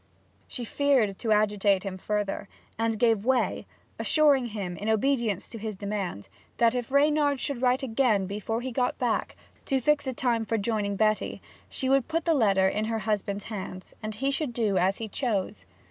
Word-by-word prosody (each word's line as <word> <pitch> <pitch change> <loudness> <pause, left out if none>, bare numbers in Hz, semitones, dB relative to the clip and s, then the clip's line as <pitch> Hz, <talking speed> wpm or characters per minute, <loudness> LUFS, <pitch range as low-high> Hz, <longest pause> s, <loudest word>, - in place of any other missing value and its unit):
She 245 - -6
feared 250 -7 +2
to 225 - -1
agitate 205 -2 +3
him 190 -2 -5
further, 205 -1 -2 0.3
and 225 0 0
gave 225 -2 +3
way, 255 +1 +1 0.3
assuring 285 -5 +3
him, 200 -5 -5
in 210 - -3
obedience 220 -3 +1
to 230 - -8
his 215 -1 -4
demand, 195 - -4 0.3
that 235 0 +4
if 245 0 -3
Reynard 290 0 +3
should 275 -3 -3
write 255 +1 +2
again 225 -5 +2
before 210 +4 -3
he 260 +1 -4
got 250 +1 0
back, 245 -3 -1 0.3
to 270 - +1
fix 290 +2 +2
a 260 - -1
time 235 -2 0
for 225 +1 -1
joining 205 -1 -1
Betty, 215 +1 +1 0.3
she 265 - -2
would 270 -1 +3
put 325 0 -1
the 335 - +3
letter 200 -8 +3
in 210 +3 0
her 225 0 -1
husband's 205 -2 -1
hands, 190 -3 -7
and 215 -1 -5
he 270 +5 0
should 275 -3 -2
do 220 -4 0
as 190 +2 +2
he 225 - -4
chose. 210 -3 -2
225 Hz, 185 wpm, -27 LUFS, 205-260 Hz, 0.3 s, that